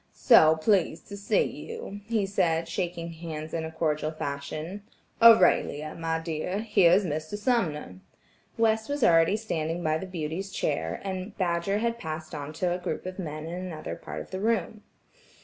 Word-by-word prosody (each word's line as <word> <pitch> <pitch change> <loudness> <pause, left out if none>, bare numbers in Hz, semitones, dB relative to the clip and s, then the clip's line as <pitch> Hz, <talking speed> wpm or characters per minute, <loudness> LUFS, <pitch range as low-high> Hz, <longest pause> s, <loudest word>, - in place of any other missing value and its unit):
"So 160 - +6
pleased 170 0 +1
to 200 - -6
see 205 - +2
you," 455 - -7
he 225 -3 +1
said, 165 -4 +1
shaking 170 -1 -3
hands 160 -1 -7
in 165 - -1
his 160 0 -7
cordial 155 -1 0
fashion. 155 +5 -5 0.4
"Aurelia, 180 -9 +5
my 165 -1 -2
dear, 165 +4 -3
here 195 -6 +4
is 195 +2 +4
Mr. 155 +4 -3
Sumner." 175 - -1 0.6
West 220 0 +2
was 285 -2 -1
already 165 +3 +5
standing 170 -5 -3
by 155 0 +1
the 190 - -6
beauty's 175 +2 -4
chair, 80 - -2
and 190 +1 -5
Badger 175 +2 0
had 235 +1 -1
passed 155 -1 -6
on 145 -1 -5
to 175 +2 0
a 180 - -3
group 180 0 -4
of 185 +1 -6
men 155 -3 -5
in 165 - -6
another 180 -3 -5
part - - -7
of - - -12
the 190 - -3
room. 215 -1 0
175 Hz, 170 wpm, -27 LUFS, 155-200 Hz, 0.6 s, So